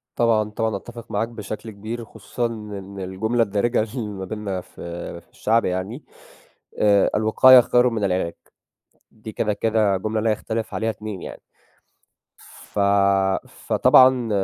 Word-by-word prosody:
طبعًا، 110 -3 +2
طبعًا، 110 0 -2
أتّفِق 120 +3 -9
معاك 105 +2 0
بشكل 110 -1 -7
كبير 110 +3 -6
خصوصًا 120 +2 -5
إن 105 -4 -6
الجملة 110 +6 0
الدارجة 110 +3 0
اللي 120 -5 -3
ما 95 -2 -6
بيننا 100 -2 -4
في 85 0 -8
في - - -31
الشعب 115 +1 +1
يعني 95 +9 -3 0.8
آآ، 100 -2 +4
"الوقاية 125 +4 +7
خيرٌ 125 +1 +3
من 115 -3 -3
العلاج." 90 -3 0 0.8
دي 110 0 -10
كده، 105 0 -1
كده 110 -2 +1
جملة 110 +3 -2
لا 110 +1 +1
يختلِف 110 +1 -4
عليها 110 +1 -1
اتنين 105 -3 -7
يعني، - - -9 1.0
ف - - -10 0.7
فطبعًا 130 -2 +4
110 Hz, 135 wpm, -22 LUFS, 100-115 Hz, 1.0 s, الوقاية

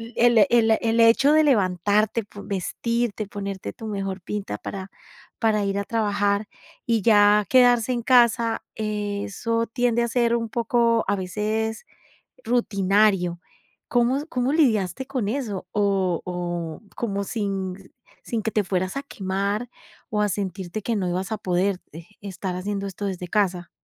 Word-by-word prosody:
el 235 -4 +5
el 225 -2 +4
el 230 0 +1
hecho 235 +6 +5
de 310 0 +5
levantarte, 210 - +2
po 205 0 -11
vestirte, 220 +3 -2
ponerte 200 -2 -5
tu 225 -2 -8
mejor 195 -2 -4
pinta 195 - -4
para 190 -1 -7 0.5
para 215 -2 +2
ir 195 0 -1
a - - -1
trabajar, 205 -2 0 0.4
y 230 -4 +1
ya 205 -1 +5
quedarse 245 -2 +4
en 240 -1 -1
casa, 235 -2 +3
eso 215 +2 -2
tiende 240 0 +1
a 235 - +1
ser 235 0 +2
un 230 -1 -2
poco, 235 0 +1
a 200 - +2
veces 215 - -2 0.6
rutinario. 200 -5 +2 0.5
¿Cómo 255 +4 +2
cómo 255 +1 -1
lidiaste 250 - +2
con 255 -7 -2
eso? 215 -7 -3
O 195 -4 +1
o 175 -2 -4
como 200 -4 -2
sin 195 -3 -4 0.3
sin 230 -2 -2
que 220 - -1
te 210 - +1
fueras 185 +2 -2
a 275 - -3
quemar, 200 +1 -2 0.4
o 210 -1 0
a 210 - +2
sentirte 190 +1 -4
que 230 - -1
no 185 -3 -1
ibas 185 +4 -3
a - - -2
poder, 185 +1 0
eh, 165 +1 -10
estar 190 -2 -5
haciendo 200 +1 -3
esto 195 +2 -7
desde 180 -2 -4
casa. 180 -3 0
210 Hz, 150 wpm, -24 LUFS, 195-230 Hz, 0.6 s, el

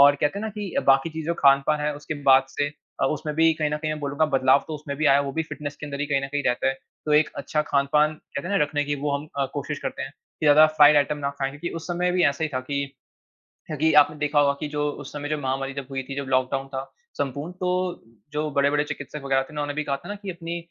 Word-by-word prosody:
और 140 0 +8
कहते 145 +7 +1
हैं 210 - -4
ना 220 - -2
कि 210 -3 -6
बाकी 135 +4 +4
चीज़ 160 -1 -6
जो 170 - 0
खान-पान 140 +2 +4
है 150 0 -1
उसके 150 +1 -5 0.2
बाद 135 0 +7
से 145 +1 -1 0.3
अ, - - +4
उसमें 150 0 -2
भी 165 0 +5
कहीं 155 -1 -1
न 150 - 0
कहीं 155 0 -3
मैं 155 - -6
बोलूँगा 145 +2 0
बदलाव 130 +1 +4
तो 155 - -4
उसमें 145 -1 -6
भी 155 +1 +1
आया 140 - +5
वो 140 -1 -2
भी 160 - 0
फ़िटनेस 150 -2 -7
के 150 - -7
अंदर 140 -1 -5
ही 145 - 0
कहीं 140 -1 +1
न - - -2
कहीं 145 0 0
रहता 125 - +1
है। 135 - +2 0.3
तो 150 - +1
एक 150 +1 +5
अच्छा 150 -1 -1
खान-पान 150 +2 +2
कहते 155 +2 -7
हैं 200 - +1
ना - - +3
रखने 145 0 -1
की 145 0 -1
वो 145 0 -1
हम 145 +2 -8
अ, 140 - +2
कोशिश 145 +1 -3
करते - - -4
हैं 135 - -5 0.3
की 155 - +1
ज़्यादा 150 +2 +8
फ़्राइड 150 -1 +6
आइटम 145 +1 +2
ना 140 -1 -1
खाएँ 135 -1 -1
क्योंकि 145 +5 -5
उस 165 - -7
समय 180 +1 0
भी 180 -1 +2
ऐसा 140 +3 -3
ही 155 - -1
था 130 - 0
कि 140 0 0 1.0
कि 160 0 +4
आपने 150 +1 +1
देखा 150 0 +1
होगा 140 -1 +4
कि 150 - -2
जो 145 0 -2 0.2
उस 135 - -10
समय 145 0 -5
जो 155 - 0
महामारी 135 0 -2
जब 140 -2 -5
हुई 135 -1 -3
थी 135 +1 -7
जब 140 -1 -3
लॉकडाउन 130 +1 +1
था 135 -1 -4 0.4
संपूर्ण 145 +4 -3
तो, 180 0 -2 0.3
जो 150 +1 -1
बड़े-बड़े 145 +1 +2
चिकित्सक 150 0 -6
वग़ैरह 135 -1 +2
थे 145 +3 -13
ना 150 - -3
उन्होंने 145 0 -3
भी 150 - -2
कहा 140 -1 -1
था 140 - -13
ना 205 - -3
कि 195 - -4
अपनी 170 -1 -5
145 Hz, 280 wpm, -24 LUFS, 140-155 Hz, 1.0 s, और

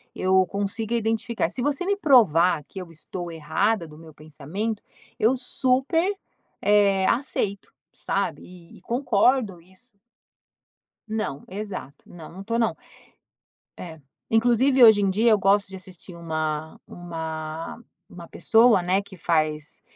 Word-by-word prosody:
eu 185 0 +3
consiga 205 +4 -3
identificar 225 +1 -1
se 255 - -4
você 290 +5 -1
me 400 +2 +1
provar 185 - +4
que 195 - -9
eu 180 -2 -9
estou 170 +2 -7
errada 165 +4 -1
do 150 -1 -14
meu 160 -1 -14
pensamento, 155 +9 -5 0.4
eu 230 +5 +3
super, 265 +8 0 0.5
eh, 200 -2 +3
aceito, 215 -6 -2 0.2
sabe? - - -3
E 175 -2 -15
e - - -19
concordo 235 -3 +1
isso. 190 +7 -22 1.2
Não. 215 -10 -4
Exato. 195 -7 -7
Não, 165 -3 -12
não 190 +3 -10
tô 230 +2 -1
não. 230 -1 +1 1.0
É. 160 -3 -9 0.3
Inclusive, 245 +4 +3
hoje 220 -2 +7
em 195 -1 +2
dia 220 +5 +3
eu 215 - +4
gosto 200 +1 +2
de 190 - -11
assistir 185 -1 -11
uma 155 -2 -4
uma 160 -1 -6 0.3
uma 170 -1 -12
pessoa, 225 -3 +4
né, 185 +2 +1
que 200 -1 -14
faz 155 -3 -1
195 Hz, 135 wpm, -24 LUFS, 165-225 Hz, 1.2 s, hoje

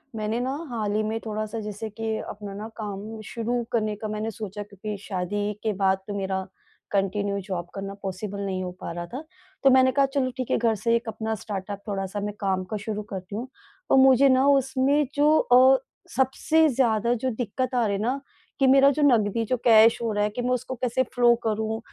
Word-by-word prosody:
मैंने 215 +2 -2
ना, 255 +2 -1 0.2
हाल 215 -4 -2
ही 215 - +2
में 220 +1 -2
थोड़ा-सा 215 0 -4
जैसे 210 +1 -5
कि 220 +1 -3
अपना 205 -1 -7
ना 210 +2 -6
काम 215 +1 -6
शुरू 235 +2 -2
करने 215 -2 0
का 215 +1 -5
मैंने 215 +1 -3
सोचा 210 -1 -6
क्योंकि 205 +1 -7
शादी 205 +2 -2
के 220 -1 0
बाद 190 0 +3
तो 205 - -4
मेरा 190 -1 -1 0.5
कंटिन्यू 200 0 0
जॉब 175 -3 -3
करना 195 0 -5
पॉसिबल 195 +1 -4
नहीं 190 -1 -2
हो 180 - -4
पा - - -5
रहा 175 0 -5
था। 270 +5 -5 0.4
तो 270 - +7
मैंने 260 0 +5
कहा 275 +1 +3
चलो 260 -2 +2
ठीक 255 -2 -3
है - - +3
घर 230 -1 +2
से 230 0 +4
एक 235 0 -2
अपना 220 0 -3
स्टार्टअप 200 -1 -6
थोड़ा-सा 195 0 -3
मैं - - -6
काम 190 -2 0
का - - 0
शुरू 215 -1 -3
करती 190 +1 -6
हूँ। 235 +4 -4 0.4
तो - - +5
मुझे 270 +1 +6
ना 260 +1 +4
उसमें 275 +1 +3
जो 300 +2 +4
अ, 260 +2 +6 0.4
सबसे 305 +5 +3
ज़्यादा 235 -3 +2
जो 255 +2 -1
दिक्कत 250 +3 -2
आ 240 -2 +3
रही 200 - 0
है 195 - -3
ना 255 +5 -1 0.4
कि 270 - +4
मेरा 275 +1 +7
जो 305 - -1
नकदी 230 -5 +3
जो 255 - 0
कैश 225 -1 +6
हो 230 -1 -1
रहा 205 - +1
है 210 - +1
कि 245 - -5
मैं 245 - -1
उसको 255 +1 -3
कैसे 250 +1 0
फ्लो 240 -1 +5
करूँ, 220 0 -1
220 Hz, 215 wpm, -25 LUFS, 205-250 Hz, 0.5 s, तो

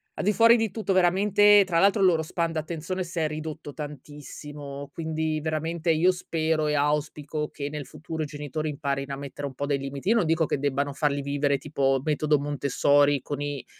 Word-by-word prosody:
al - - -3
di 210 - +3
fuori 230 +2 +6
di 225 -3 -1
tutto, 215 -3 -1
veramente, 200 +3 +5
tra 170 -3 +1
l'altro, 200 +2 +4
il 190 - +6
loro 165 -3 +3
span 165 +1 -2
d'attenzione 165 +3 -3
s'è 170 -2 -2
ridotto 155 -1 -6
tantissimo, 145 -1 -8
quindi 160 -1 -2
veramente 160 +2 -1
io 165 +3 +4
spero 160 -3 -1
e 150 - +1
auspico, 150 +1 -1
che 140 0 -5
nel 150 -2 -6
futuro 155 +1 -6
i - - -2
genitori 150 +1 -4
imparino 140 -1 -3
a - - -4
mettere 140 0 -6
un 135 - -9
po' 140 - -3
dei 140 -1 0
limiti. 140 +6 -4
Io 230 - +5
non 225 - +3
dico, 160 0 +2
che 140 - -1
debbano 140 0 -1
farli 145 -1 0
vivere 140 0 0
tipo 135 -2 0
metodo 150 -1 +1
Montessori, 145 0 +2
con 145 +2 -5
i 145 -3 -4
150 Hz, 195 wpm, -26 LUFS, 145-165 Hz, -, fuori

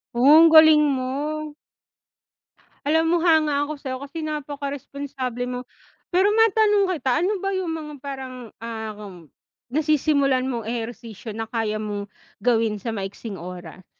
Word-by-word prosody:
Oh, 240 - +1 0.2
ang 330 - +8
galing 315 -1 +8
mo. 255 -2 -1 1.8
Alam 320 +2 +3
mo, 345 - +3
hanga 310 -4 +3
ako 305 - -4
sa'yo 260 -2 -4
kasi 320 +3 -7
napakaresponsable 280 -4 -4
mo. 250 0 -4 0.5
Pero 375 +3 +4
matanong 430 -2 +4
kita, 265 -2 -2
ano 390 - +2
ba 390 - -1
yung 370 -3 -2
mga 305 -2 -6
parang, 265 -2 -6 0.3
um, 210 -6 -7 0.4
nasisimulan 280 -2 +2
mong 240 -3 -3
ehersisyo, 230 -2 -6
na 225 0 -4
kaya 225 -2 -1
mong 205 -1 -4 0.3
gawin 225 -1 +1
sa 230 - -4
maiksing 200 +1 -6
oras? 180 0 -9
265 Hz, 135 wpm, -23 LUFS, 225-310 Hz, 1.8 s, ang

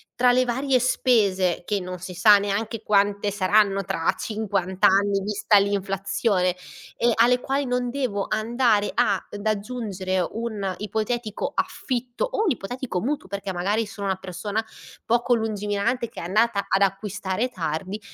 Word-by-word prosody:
tra 250 0 +4
le 255 +1 +3
varie 260 +2 +1
spese, 200 -9 +2
che 205 +1 0
non 180 0 -6
si 180 +1 -8
sa 205 +4 +7
neanche 210 +3 -2
quante 205 0 +2
saranno 200 0 +2
tra 165 -2 0
50 195 -4 -3
anni, 200 0 +4
vista 210 +1 +2
l'inflazione, 195 -1 0 0.4
e 240 0 +2
alle 245 +2 +4
quali 275 +2 -1
non 250 -1 -1
devo 240 -7 -2
andare 220 -1 +1
ad 205 -2 -1
aggiungere 205 -3 -2
un 210 -4 -3
ipotetico 215 +2 -3
affitto 250 - -2
o - - -1
un 385 - +2
ipotetico 245 -4 -4
mutuo 280 -1 -2
perché 200 0 -4
magari 200 +5 0
sono 205 -1 -7
una 190 - +1
persona 200 +4 -4 0.4
poco 240 +2 +2
lungimirante 220 +2 -1
che - - -10
è - - -6
andata 210 +2 +1
ad 195 - +2
acquistare 195 +3 -1
tardi, 185 0 -4
205 Hz, 145 wpm, -24 LUFS, 195-235 Hz, 0.4 s, sa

